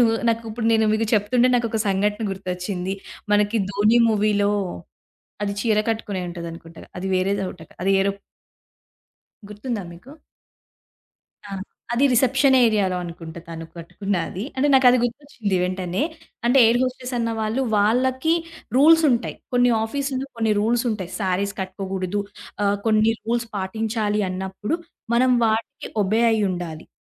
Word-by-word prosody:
నేను 240 - +6 0.2
నాకు 230 0 +1
ఇప్పుడు 225 +1 -3
నేను 220 0 +3
మీకు 220 +1 +1
చెప్తుంటే 235 +4 +3
నాకు 240 -1 +2
ఒక 220 - -1
సంఘటన 205 +3 0
గుర్తొచ్చింది. 185 0 -4 0.4
మనకి 205 +2 +3
ధోని 210 +4 +3
మూవీలో 205 -1 +2 0.9
అది 200 - -1
చీర 220 -2 +2
కట్టుకునే 220 -4 -2
ఉంటది 170 -1 -6
అనుకుంటగా. 165 0 -12
అది 190 - -4
వేరేదవట 185 -2 -1 0.2
అది 195 - +2
ఏరో 200 +1 +2 1.4
గుర్తుందా 210 0 -4
మీకు? 215 +12 -13 1.3
ఆ! - - -10 0.4
అది 255 +4 +3
రిసెప్షన్ 265 +2 +4
ఏరియా‌లో 205 -5 +2
అనుకుంట 165 -1 -9
తను 165 0 -6
కట్టుకున్నాది. 180 +2 -3
అంటే, 285 +3 +2
నాకది 255 -1 +6
గుర్తొచ్చింది 240 -5 -2
వెంటనే 185 +3 -2 0.4
అంటే 260 +3 +4
ఎయిర్ 235 +2 +3
హోస్టెస్ 255 0 -3
అన్న 230 0 0
వాళ్ళు 220 +5 0
వాళ్ళకి 260 +9 +2 0.4
రూల్స్ 320 +4 +6
ఉంటాయి. 235 -1 -1 0.2
కొన్ని 245 0 +4
ఆఫీస్‌లో, 270 +2 -3
కొన్ని 225 -1 +1
రూల్స్ 235 +3 +1
ఉంటాయి. 190 -5 -4
శారీస్‌ 195 +1 0
కట్టుకోకూడదు. 190 +1 -3 0.4
ఆహ్, 200 0 +2
కొన్ని 220 +1 +4
రూల్స్ 235 0 -1
పాటించాలి 210 +1 -1
అన్నప్పుడు 190 - -3 0.4
మనం 255 +1 +4
వాటికి 220 +1 -2
ఒబే 215 +4 +1
అయ్యుండాలి. 180 -6 -2
215 Hz, 130 wpm, -23 LUFS, 190-240 Hz, 1.4 s, నేను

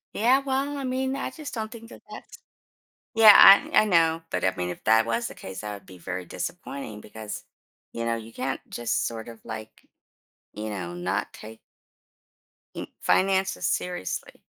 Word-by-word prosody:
Yeah, 250 +5 +4
well, 275 +1 -2
I 275 - -4
mean, 260 +1 -1
I - - -3
just 305 -3 -9
don't 220 -2 -4
think 230 0 -11
that - - -13
that's - - -11 0.8
Yeah, 220 -1 +10
I 195 +2 +8
I - - +1
know, 165 -4 +3
but, - - -2
I 95 0 +2
mean, 90 -1 -2
if - - -8
that 110 +1 +5
was 115 +1 -1
the - - -10
case 95 0 -8
that 105 -1 -5
would 100 -1 -12
be 95 - -13
very 90 +1 -5
disappointing 135 - -6
because, 105 0 -8 0.5
you 115 - -4
know, 115 0 0
you 115 0 -9
can't 130 +2 -3
just 120 -1 -1
sort 115 -1 -6
of, 115 -1 -12
like, 110 0 -8 0.7
you 110 +1 -5
know, 90 -4 -5
not 90 +4 -2
take 110 +1 -11 1.2
n - - -5 0.2
finances 190 0 +2
seriously. 180 - -3
115 Hz, 175 wpm, -26 LUFS, -, 1.2 s, Yeah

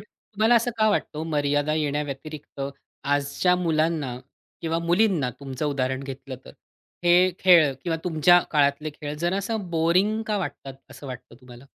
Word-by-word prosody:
तुम्हाला 220 +2 -1
असं 235 +1 +3
का 215 - +4
वाटतं 155 - -2
ओ - - -3
मर्यादा 145 -1 0
येण्याव्यतिरिक्त 150 -1 -4 0.4
आजच्या 145 +5 +1
मुलांना 155 -6 0 0.4
किंवा 165 0 -1
मुलींना 170 - +2
तुमचं 135 +2 -4
उदाहरण 130 -1 -1
घेतलं 135 -1 -7
तर, - - -11 0.5
हे 180 +1 +5
खेळ 170 -6 +6
किंवा 165 -2 0
तुमच्या 175 +1 +5
काळातले 145 +1 +1
खेळ 145 0 -7
जरा 175 +4 -1
असं 200 -1 -3
बोरिंग 185 +7 +2
का 210 -1 0
वाटतात, 140 -6 -6 0.2
असं 140 +2 -11
वाटतं 125 -2 -9
तुम्हाला? 125 +1 -14
155 Hz, 150 wpm, -24 LUFS, 140-180 Hz, 0.5 s, खेळ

